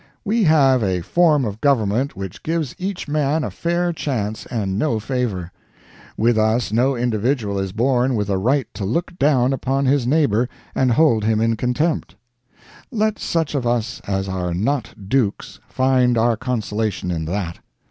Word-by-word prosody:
We 215 +1 +2
have 135 -5 +4
a 95 -4 0
form 155 - +3
of 105 0 -5
government 130 -2 +1
which 95 -2 -7
gives 160 -5 -2
each 190 -2 -4
man 150 +1 0
a - - -3
fair 175 +1 -1
chance 110 -9 -3
and 100 -5 -2
no 115 -6 +1
favor. 110 -7 -3 0.7
With 115 0 +3
us 110 +1 +1
no 125 +5 +2
individual 120 -3 0
is 95 -1 -2
born 125 +3 +1
with 105 -2 -1
a 95 -2 0
right 130 +6 +1
to 100 +1 -5
look 170 - -2
down 135 -3 +3
upon 135 +1 -1
his 130 -2 +2
neighbor 125 -5 +2 0.2
and 130 -2 +2
hold 125 -7 +3
him 110 0 +2
in 115 0 +2
contempt. 135 +8 -1 0.8
Let 215 -2 0
such 165 -3 -1
of 130 -4 -1
us 120 -1 -1
as 95 -1 -1
are 90 -2 -2
not 115 -1 -2
dukes 120 -4 -1
find 130 -2 +2
our 115 +1 +3
consolation 110 -5 -2
in 80 -2 -2
that. 85 0 -3
120 Hz, 165 wpm, -21 LUFS, 105-140 Hz, 0.8 s, have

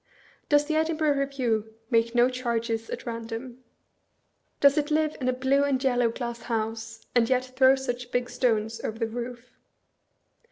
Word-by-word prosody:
Does 290 -1 +4
the 310 +1 -1
Edinburgh 315 -2 +2
Review 245 -6 -1 0.2
make 230 0 +2
no 240 0 +6
charges 235 -3 -2
at - - -6
random? 235 +2 -6 1.0
Does 280 0 +6
it 300 -1 0
lire 310 0 +2
in 255 - -1
a - - +4
blue 265 +2 +2
and 280 -2 +2
yellow 245 -3 +3
glass 235 0 -5
house, 225 -1 -4
and 235 -2 +3
yet 255 0 +2
throw 260 0 +6
such 245 -2 -4
big 245 0 0
stones 225 -3 0
over 220 - -3
the 230 - 0
roof? 240 +1 -7
245 Hz, 160 wpm, -27 LUFS, 230-270 Hz, 1.0 s, no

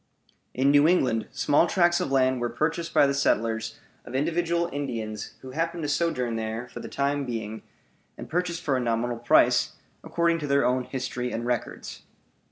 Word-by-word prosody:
In 135 +2 +3
New 145 +1 +6
England 130 -10 +2
small 145 +4 +3
tracts 175 0 +3
of 160 - -2
land 130 -2 +2
were 120 - 0
purchased 165 +4 -2
by - - +5
the 140 - +1
settlers 115 -4 0 0.2
of 120 - -8
individual 170 +4 0
Indians 115 -7 -4
who 130 - -8
happened 165 +3 -2
to - - -1
sojourn 125 -7 0
there 110 +2 -4
for - - -8
the - - -7
time 140 +1 0
being, 110 -3 -5 0.6
and - - -8
purchased 175 0 -2
for 140 - +1
a - - +1
nominal 120 0 -1
price, 120 - +4 0.3
according 170 -1 +1
to 150 - -4
their 140 0 +3
own 125 0 +1
history 125 -1 -4
and 115 +1 -3
records. 120 -1 -4
135 Hz, 175 wpm, -26 LUFS, 120-165 Hz, 0.6 s, New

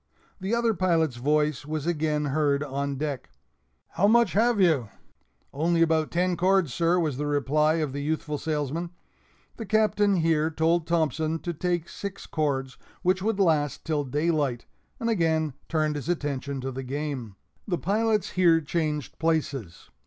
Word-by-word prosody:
The 195 +5 -1
other 235 -1 +2
pilot's 165 - +1
voice 150 +2 +1
was 155 0 -4
again 155 -3 0
heard 145 -1 +2
on 140 0 -3
deck 145 -2 -4 0.6
"How 200 - +2
much 235 -1 +4
have 230 +1 +3
you?" 155 - +3 0.6
"Only 165 +3 +2
about 160 -1 +1
ten 180 +1 +1
cords, 185 -5 +2
sir," 170 +5 +2
was 155 -6 -1
the 145 +1 -2
reply 145 +2 +2
of 155 -5 -1
the 140 - -3
youthful 150 0 -2
salesman. 155 +2 -2 0.7
The 225 - -5
Captain 210 -2 +3
here 160 -2 +2
told 165 +1 +1
Thompson 160 -1 0
to 175 - -2
take 175 0 -1
six 200 +1 -7
cords, 135 -4 -2 0.2
which 185 +1 +2
would 210 0 -1
last 155 -7 +1
till 155 -2 0
daylight 145 -2 0 0.3
and 230 - -2
again 160 - +1 0.2
turned 155 -2 0
his 145 +3 -5
attention 140 -4 -2
to 135 +1 -3
the 130 +1 -5
game. 135 -5 -4 0.3
The 180 -4 0
pilots 215 +3 0
here 170 -3 +4
changed 150 -2 -3
places. 140 - -2
155 Hz, 155 wpm, -26 LUFS, 145-175 Hz, 0.7 s, much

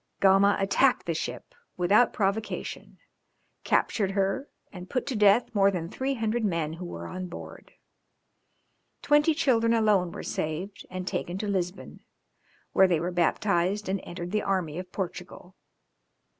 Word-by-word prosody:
Gama 195 +1 +5
attacked 245 +6 +2
the 170 - -1
ship 125 -6 -5 0.2
without 200 +7 +4
provocation, 205 +2 -3 0.7
captured 195 -3 +1
her 195 +8 -1 0.2
and 180 -1 -9
put 255 - -1
to 270 - -3
death 210 +3 +4
more 200 -2 +4
than 170 -4 -3
three 270 +6 -2
hundred 225 0 -1
men 165 -6 -1
who 175 +2 -7
were 85 - -7
on 185 - -5
board. 175 - -10 1.3
Twenty 295 +2 +4
children 235 -7 +2
alone 205 -6 +2
were - - -7
saved 175 +6 -4
and 185 0 -6
taken 180 -1 -3
to 210 +1 -3
Lisbon, 185 -2 -3 0.7
where 190 - +6
they 175 -3 +1
were 175 +3 -2
baptized, 180 +3 +1
and 195 0 -1
entered 175 0 -7
the 215 0 +1
army 180 -5 -1
of 180 0 -8
Portugal. 180 0 -6
195 Hz, 145 wpm, -27 LUFS, 180-215 Hz, 1.3 s, where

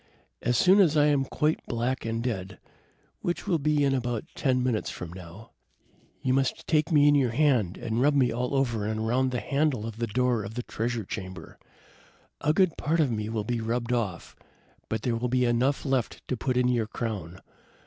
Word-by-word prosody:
As 120 0 +1
soon 190 - +5
as 160 -6 +4
I 145 - +5
am 145 -2 +2
quite 150 +3 0
black 120 +2 -2
and 115 0 -2
dead, 95 -6 -3 0.6
which 175 - -3
will 175 -5 +1
be 150 0 +2
in 135 -1 +2
about 120 -4 -1
ten 130 -3 +1
minutes 120 -4 0
from 85 -1 -7
now, 95 +6 -11 0.7
you 130 - +2
must 135 0 0
take 155 +2 +1
me 145 -2 +5
in 145 - +6
your 135 -4 +3
hand 120 - +2
and 110 +2 -2
rub 145 +2 +3
me 130 -3 +3
all 125 +3 -2
over 120 -6 0
and 110 0 -2
around 125 +4 +1
the 125 -1 -2
handle 140 -1 0
of 115 -1 -6
the 115 0 -1
door 125 0 +1
of 100 +3 -7
the 125 - -3
treasure 115 -2 -3
chamber. 95 -4 -7 0.8
A 150 - +2
good 185 +1 +2
part 160 +3 0
of 145 -6 +3
me 105 -1 -2
will 110 -2 -2
be 120 +2 -2
rubbed 120 +2 -1
off, 100 -8 -3 0.5
but 110 0 -2
there 120 -2 0
will 120 +2 -2
be 125 0 +2
enough 125 +5 +1
left 130 -4 -1
to 130 - 0
put 125 +1 -1
in 125 0 +3
your 120 -3 +1
crown. 100 -7 -5
125 Hz, 205 wpm, -27 LUFS, 110-135 Hz, 0.8 s, in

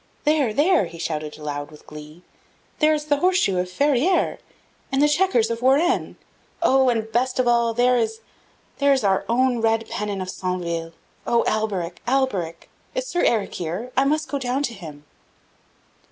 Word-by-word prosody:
"There! 295 -6 +2
there!" 310 - +3
he 170 0 -10
shouted 155 -2 -4
aloud 145 -1 -5
with 150 -1 -16
glee. 150 +3 -12
"Oh, - - -37 0.5
there 310 0 +4
is 300 0 -4
the 290 -1 +2
horse 365 +4 +2
shoe 195 - +1
of 180 0 -2
Ferrieres! 285 - +1 0.5
and 270 - +1
there 295 - +5
the 295 - +2
chequers 295 -12 +2
of 230 0 -3
Warenne! 295 +8 +2 0.5
Oh, 265 -1 +4
and 225 -2 -1
best 250 +2 0
of 255 -1 +1
all, 235 -1 +2
there 250 +1 +3
is 225 -1 -2 0.6
there 280 0 +4
is 265 - 0
our 195 -1 +2
own 245 0 +2
red 225 0 +1
pennon 205 -2 -3
of 185 0 -4
Centeville! 170 -3 -3 0.3
O 235 -1 +3
Alberic! 195 -6 -2
Alberic! 205 -11 -1 0.3
is - - -1
Sir 355 -8 -1
Eric 220 -4 +1
here? 180 +9 -4
I 265 - +4
must 305 +2 0
go 285 - -3
down 260 +2 -1
to 245 - -2
him!" 155 -7 -11
235 Hz, 180 wpm, -23 LUFS, 180-275 Hz, 0.6 s, there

